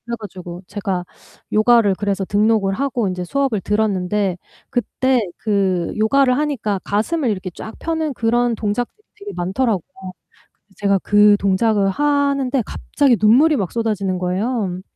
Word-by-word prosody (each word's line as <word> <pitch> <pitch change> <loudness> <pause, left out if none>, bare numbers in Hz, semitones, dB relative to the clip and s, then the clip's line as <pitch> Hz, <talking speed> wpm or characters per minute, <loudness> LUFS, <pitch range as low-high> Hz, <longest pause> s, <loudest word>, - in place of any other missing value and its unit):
그래 235 0 -3
가지고 180 -4 -8
제가 195 -3 -3 0.5
요가를 215 -1 +4
그래서 200 -2 -1
등록을 205 0 +2
하고 245 -2 -1
인제 180 -1 -3
수업을 255 +1 -1
들었는데 200 -2 0 0.3
그때 250 +1 0 0.2
그 190 -5 0
요가를 255 +4 +3
하니까 265 -10 -1
가슴을 245 +7 0
이렇게 190 -3 -3
쫙 220 +5 -9
펴는 320 -3 -2
그런 240 0 +1
동작들이 215 +3 -2 0.3
되게 410 0 -8
많더라고요. 190 -1 -2 0.7
근데 205 - -1
가 195 - +4
그 205 0 +5
동작을 200 +1 +2
하는데 280 +1 +1
갑자기 270 +1 +1
눈물이 270 +9 +5
막 190 -5 -2
쏟아지는 210 -5 -1
거예요. 185 +1 -2
215 Hz, 330 characters per minute, -19 LUFS, 195-250 Hz, 0.7 s, 그